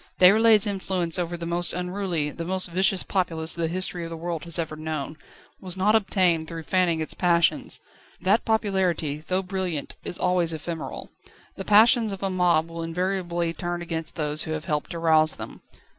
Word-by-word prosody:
Déroulède's 215 +3 +6
influence 190 -4 0
over 175 0 -2
the 170 - -6
most 175 +1 +2
unruly, 180 -4 -2
the 170 - -6
most 185 0 0
vicious 190 +1 +2
populace 165 -4 0
the 170 -1 -1
history 180 0 -3
of 165 - -6
the 165 - -6
world 170 0 -4
has 170 -2 +1
ever 160 -2 -3
known, 155 -1 -5 0.4
was 185 -1 -3
not 205 +3 +3
obtained 185 -6 +2
through 165 -1 -6
fanning 175 -1 +1
its 155 - -2
passions. 170 -2 +1 0.4
That 195 +5 +2
popularity, 190 -9 0
though 185 +5 -2
brilliant, 180 -6 -3
is - - -4
always 180 -2 +1
ephemeral. 160 +1 -6 0.4
The 195 - -7
passions 220 +1 +5
of 195 0 -6
a 195 - 0
mob 175 -3 +2
will 165 0 -7
invariably 175 0 -2
turn 175 0 -4
against 165 -1 -5
those 150 -1 -1
who 160 - -2
have 155 -1 -5
helped 150 -4 -2
to 170 - -5
rouse 160 -1 +3
them. - - -9
175 Hz, 180 wpm, -25 LUFS, 165-190 Hz, 0.4 s, Déroulède's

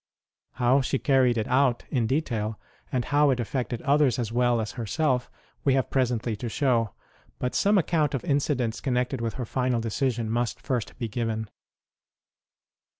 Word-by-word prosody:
How 125 +2 +3
she 135 +1 0
carried 130 -3 +3
it 110 - -1
out 130 -1 +2
in 120 -5 +1
detail, 115 -6 -1 0.3
and 125 -2 0
how 145 0 +3
it 130 -2 +1
affected 120 0 -3
others 140 -3 +3
as 115 -3 -2
well 120 0 +2
as 110 -1 -3
herself, 125 +2 -1 0.3
we 135 -2 +3
have 130 - 0
presently 120 -3 0
to 120 +2 -4
show; 115 -4 +1 0.4
but 125 - -2
some 205 +1 +3
account 155 -5 +1
of 125 - -4
incidents 135 -5 0
connected 125 -1 -1
with 115 -1 -2
her 125 - -3
final 125 0 0
decision 115 +1 -1
must 115 0 -1
first 130 -6 -3
be 115 - -3
given. 110 -1 -3
125 Hz, 160 wpm, -26 LUFS, 115-135 Hz, 0.4 s, How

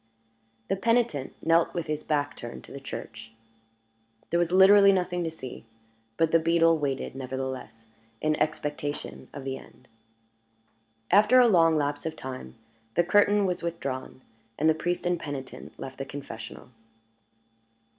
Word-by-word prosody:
The - - +1
penitent 225 - 0
knelt 165 +1 +3
with 170 -2 -2
his 155 0 -3
back 145 -2 -1
turned 120 - -8
to - - -14
the 140 - -7
church. 115 -4 -8 1.0
There 170 - +2
was 175 -1 +1
literally 200 +2 +7
nothing 180 -2 0
to 165 - -1
see; 130 -6 -8 0.5
but 165 -1 +2
the 165 - +5
beadle 165 0 +3
waited, 135 -2 -2
nevertheless, 130 -3 -6 0.3
in 155 0 +1
expectation 150 -1 -3
of 140 - -8
the 135 0 -4
end. 125 - -18 1.2
After 210 +6 +6
a 245 - +7
long 165 -6 +5
lapse 145 +1 -1
of 160 - -4
time 130 - -8 0.4
the 175 - +4
curtain 205 +2 +4
was 180 -2 -1
withdrawn, 135 -6 -5 0.3
and 160 +1 +2
priest 175 +2 -1
and 175 -1 +1
penitent 145 -4 -7
left 130 0 -8
the 135 - -3
confessional. 125 -5 -9
155 Hz, 145 wpm, -27 LUFS, 135-175 Hz, 1.2 s, literally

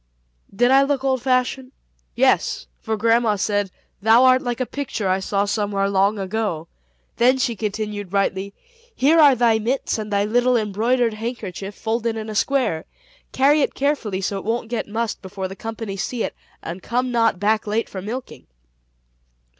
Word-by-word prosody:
Did 245 +5 +2
I 270 +1 +7
look 275 -1 0
old 260 -2 +1
fashioned? 255 +1 0 0.4
Yes, - - +2
for 220 - -3
grandma 230 0 +3
said, 205 0 0 0.3
"Thou 225 +4 +6
art 255 0 +5
like 245 0 -3
a 255 - 0
picture 245 -7 -4
I 185 +1 +2
saw 200 +1 0
somewhere 200 -1 0
long 200 +2 +2
ago." 195 -4 -3 0.5
Then 250 +3 +4
she 250 -3 0
continued 210 -2 -4
brightly, 195 0 -1 0.4
"Here 310 +5 +4
are 285 -4 +7
thy 230 -2 +3
mits, 235 +1 -1
and 210 -1 -5
thy 200 0 +2
little 245 +3 +2
embroidered 225 +3 +1
handkerchief 210 -4 -6
folded 225 0 -2
in 220 0 -5
a - - -7
square. 250 -10 0 0.5
Carry 285 +3 +4
it - - 0
carefully 270 -9 -1
so 195 +1 -2
it - - -10
won't 225 +1 -2
get 240 - -3
mussed 225 +1 -3
before 190 0 -5
the 190 - -9
company 225 -1 -6
see 225 +4 -2
it, - - -3 0.3
and 175 +3 -6
come 250 +4 -1
not 230 -5 +2
back 215 +2 +1
late 220 +2 0
for 190 - -7
milking." 240 +6 -7
220 Hz, 170 wpm, -22 LUFS, 200-250 Hz, 0.5 s, I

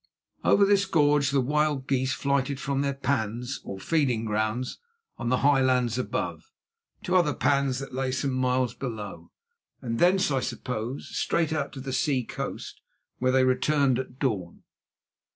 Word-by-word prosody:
Over 200 - +5
this 200 0 +3
gorge 145 -4 +3
the 140 -1 +2
wild 150 0 0
geese 130 -1 +1
flighted 140 0 0
from 140 0 -1
their 140 -1 -1
pans 125 -2 -2
or 95 - -7
feeding 130 -5 +1
grounds 110 +3 -1 0.4
on 120 - -2
the 130 - +3
high 140 -2 +5
lands 125 -2 +2
above, 445 - -3 0.5
to 180 - 0
other 165 -6 +3
pans 140 0 +1
that 135 -1 -7
lay 130 0 -1
some 135 +1 -1
miles 130 -1 +1
below, 110 -6 -6 0.5
and 115 -3 -3
thence, 185 -1 +4
I 135 - +2
suppose, 125 +1 -4
straight 165 -2 0
out 145 -3 -2
to 135 - -7
the 130 0 -5
sea 135 -2 +1
coast, - - -6 0.4
whence 130 0 +2
they 130 0 +4
returned 130 0 +2
at 130 -1 -6
dawn. 105 -11 -2
130 Hz, 160 wpm, -27 LUFS, 125-145 Hz, 0.5 s, Over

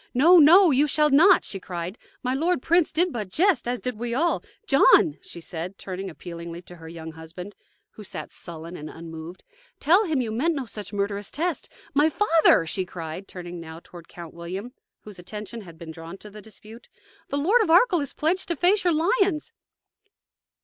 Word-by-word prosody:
"No, 335 +8 +7
no; 340 +4 +7
you 285 +3 +3
shall 300 +1 +2
not!" 315 +8 +6
she 195 - -5
cried. 180 0 -6 0.3
"My 250 0 0
lord 325 +1 0
prince 340 -1 +3
did 345 +2 +1
but 210 -5 -4
jest, 330 - +1
as 245 0 -1
did 250 -4 -4
we 235 0 -3
all. 335 +5 +1 0.2
John," 270 - +5
she 170 - -8
said, 175 +3 -6
turning 190 0 -6
appealingly 170 0 -9
to 175 0 -13
her 165 -1 -12
young 160 -1 -8
husband, 165 +5 -10 0.4
who 215 - -12
sat 195 - -7
sullen 170 0 -9
and 155 -2 -8
unmoved, 165 +2 -10 0.4
"tell 360 +9 +4
him 315 -6 0
you 235 -3 -2
meant 305 +9 0
no 275 -3 -3
such 210 -3 -8
murderous 200 0 -2
test. 335 0 -3 0.2
My 295 +3 +4
father!" 325 - +4
she 185 +4 -2
cried, 175 +1 -7
turning 175 -1 -8
now 160 0 -9
toward 170 -2 -13
Count 170 -2 -11
William, 185 +8 -7 0.3
whose 205 -4 -12
attention 210 +5 -8
had 170 -5 -13
been 165 -1 -9
drawn 165 +3 -10
to 210 +1 -13
the 210 +1 -11
dispute, 220 +2 -13 0.4
"the 280 - -3
Lord 390 +12 +3
of 420 - 0
Arkell 355 +2 +5
is 280 -2 -4
pledged 360 +5 0
to 340 - 0
face 370 +6 +3
your 350 -2 +3
lions!" 365 -1 +1
215 Hz, 190 wpm, -24 LUFS, -, 0.4 s, No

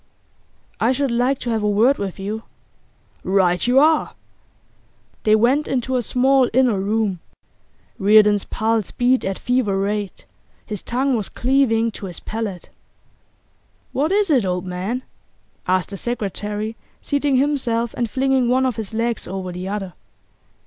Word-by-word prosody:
'I 240 +3 +3
should 275 0 -1
like 250 +3 +1
to 240 - -4
have 220 -1 0
a 210 - +1
word 230 +7 +3
with 195 -2 -4
you.' 205 +3 -4 0.8
'Right 185 0 +2
you 250 +2 +3
are!' 310 +2 +3 1.1
They 215 0 +5
went 255 +7 +2
into 260 0 -1
a 250 - +2
small 260 +2 +3
inner 245 -5 +3
room. 205 -2 0 0.8
Reardon's 210 0 +5
pulse 220 -2 -1
beat 250 +1 +1
at 195 0 -2
fever 245 -6 0
rate; 200 0 -3 0.4
his 210 -4 -5
tongue 260 +2 0
was 215 -4 -2
cleaving 240 -3 +1
to 200 - -7
his 175 - -7
palate. 215 -5 -5 1.2
'What 295 +6 0
is 400 -3 +2
it, 260 -6 +4
old 180 -1 -2
man?' 190 +8 -3 0.6
asked 185 +1 +1
the 200 - -5
secretary, 210 -1 -3 0.3
seating 285 -1 0
himself 255 -4 0
and 235 -2 -2
flinging 265 0 +1
one 260 +1 +3
of 255 -3 -1
his 220 -1 -5
legs 230 0 -1
over 185 0 -5
the 180 +1 -6
other. 195 -3 -4
225 Hz, 150 wpm, -21 LUFS, 200-255 Hz, 1.2 s, They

